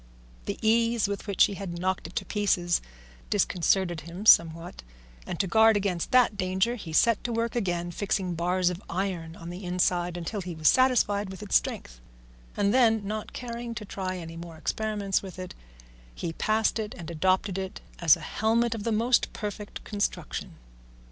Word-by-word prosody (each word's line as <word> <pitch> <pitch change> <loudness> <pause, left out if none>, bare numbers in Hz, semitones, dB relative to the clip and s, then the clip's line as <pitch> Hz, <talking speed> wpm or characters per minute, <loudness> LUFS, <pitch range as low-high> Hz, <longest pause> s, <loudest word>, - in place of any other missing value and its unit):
The - - -2
ease 230 0 +3
with 200 +1 -5
which 200 -2 +4
he - - +2
had 190 -3 -6
knocked 185 -1 -1
it 165 - -14
to - - -2
pieces 185 -5 +1 0.5
disconcerted 185 -3 +1
him 170 +6 -8
somewhat, 165 - +4 0.5
and 170 - -4
to - - +2
guard 220 +3 +5
against 190 -4 -1
that 250 -5 +4
danger 190 +4 +1
he 200 -9 -7
set 230 +7 +3
to 240 - -2
work 230 0 -1
again, 175 -6 -1
fixing 185 0 -1
bars 180 +2 +1
of 180 +1 -7
iron 170 -3 -3
on 170 0 -8
the 180 +3 -8
inside 180 -1 0
until 185 +4 -4
he 175 -2 -6
was 155 -1 0
satisfied 215 -6 +3
with 190 +2 -8
its 205 - -1
strength; - - -1 0.6
and 200 +1 +2
then, 225 -5 +4
not 215 +1 -4
caring 235 -1 -6
to 215 - -6
try 185 -2 -4
any 165 -1 -8
more 170 -1 -9
experiments 205 +2 -1
with 190 -2 -9
it, 185 -1 -7 0.6
he 165 - -4
passed 215 +4 +1
it 215 -1 -4
and 170 -2 -7
adopted 185 +3 +1
it 190 -1 -5 0.2
as 165 -4 +6
a - - -12
helmet 230 +2 +1
of 220 -3 -5
the 230 - -1
most 235 +3 +2
perfect 210 -1 -6
construction. 205 -1 -3
195 Hz, 180 wpm, -27 LUFS, 175-220 Hz, 0.6 s, as